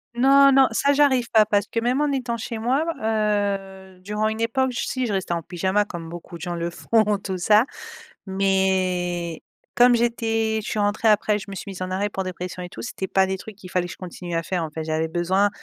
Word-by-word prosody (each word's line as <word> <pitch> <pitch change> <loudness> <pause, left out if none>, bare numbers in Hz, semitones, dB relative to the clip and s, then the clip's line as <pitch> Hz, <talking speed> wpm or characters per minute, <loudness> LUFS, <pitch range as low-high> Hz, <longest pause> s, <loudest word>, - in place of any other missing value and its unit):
Non, 275 +2 +6
non 270 -1 +6
ça 280 +5 +2
j'arrive 265 -4 +3
pas 215 -1 +6
parce 205 -1 +1
que 230 - -2
même 250 +5 +1
en 295 -1 +1
étant 250 -3 -2
chez 225 0 -5
moi, 255 +7 +1 0.2
heu, 200 -3 -1
durant 210 +3 -2
une 220 +1 -3
époque 260 +3 +1
j 240 - -3
si 255 -1 -1
je 210 - -2
restais 190 -2 -1
en 165 - -4
pyjama 190 +4 0
comme 165 -4 -7
beaucoup 170 0 -9
de - - -17
gens 175 -2 -3
le 170 0 -3
font 210 +2 +1
tout 190 -2 -3
ça 210 +6 +4 0.6
mais 185 -3 0 0.3
comme 245 0 +6
j'étais 225 -2 0
je - - -5
suis 215 - -2
rentré 205 +2 +1
après 210 0 +3
je - - -9
me 195 - -6
suis 200 - -7
mis 185 - -9
en 185 - -5
arrêt 200 +2 -1
pour 190 -1 -3
dépression 180 0 -6
et 180 - -7
tout, - - -9
c'était 190 -4 -5
pas 190 -1 +2
des 190 0 -2
trucs 215 +1 -10
qu'il 185 -3 -12
fallait 180 -1 0
que - - -7
je - - -16
continue 175 -1 -6
à 165 - +1
faire, 180 -2 -2
en 160 - -4
fait, 160 0 -5
j'avais 160 0 -1
besoin 185 +4 +2
200 Hz, 240 wpm, -23 LUFS, 185-225 Hz, 0.6 s, Non